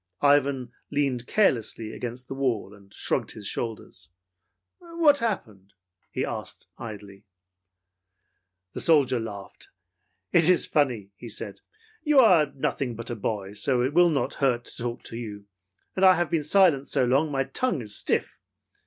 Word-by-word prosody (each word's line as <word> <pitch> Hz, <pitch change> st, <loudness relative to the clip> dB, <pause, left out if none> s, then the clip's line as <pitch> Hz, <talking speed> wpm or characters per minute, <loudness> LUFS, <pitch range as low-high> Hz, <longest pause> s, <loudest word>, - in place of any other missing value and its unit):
Ivan 140 Hz, -3 st, +3 dB, 0.2 s
leaned 135 Hz, -4 st, -1 dB
carelessly 115 Hz, -, +1 dB
against 125 Hz, +1 st, -6 dB
the -, -, -5 dB
wall 125 Hz, -7 st, -2 dB
and 100 Hz, -1 st, -18 dB
shrugged -, -, 0 dB
his 105 Hz, -, -10 dB
shoulders. 110 Hz, -3 st, -5 dB, 0.7 s
"What 335 Hz, -4 st, +2 dB
happened?" 110 Hz, -, -4 dB, 0.4 s
he -, -, -2 dB
asked, -, -, -6 dB
idly. 105 Hz, -3 st, -9 dB, 1.5 s
The -, -, -4 dB
soldier 140 Hz, -6 st, +4 dB
laughed. 100 Hz, -3 st, -8 dB, 0.6 s
"It 170 Hz, 0 st, +5 dB
is 180 Hz, -, +4 dB
funny," 120 Hz, -9 st, 0 dB
he 120 Hz, -, -9 dB
said. 105 Hz, -1 st, -4 dB, 0.4 s
"You 300 Hz, -3 st, +2 dB
are 180 Hz, -, +6 dB
nothing 130 Hz, -2 st, -2 dB
but 115 Hz, +2 st, -7 dB
a -, -, -3 dB
boy, 100 Hz, -2 st, -4 dB
so 120 Hz, +4 st, +1 dB
it 130 Hz, +3 st, -1 dB
will 175 Hz, +1 st, +5 dB
not 140 Hz, -6 st, -1 dB
hurt 125 Hz, -3 st, +1 dB
to -, -, -8 dB
talk 120 Hz, -1 st, -4 dB
to 115 Hz, -, -7 dB
you, 105 Hz, -4 st, -7 dB, 0.5 s
and 190 Hz, -, -1 dB
I 185 Hz, -1 st, +8 dB
have 175 Hz, -3 st, -1 dB
been 160 Hz, -3 st, +1 dB
silent 150 Hz, -4 st, +4 dB
so 130 Hz, -, +1 dB
long 135 Hz, +6 st, +2 dB
that -, -, -8 dB
my 135 Hz, 0 st, +1 dB
tongue's 135 Hz, -, -2 dB
stiff. -, -, -1 dB
125 Hz, 155 wpm, -26 LUFS, 110-155 Hz, 1.5 s, I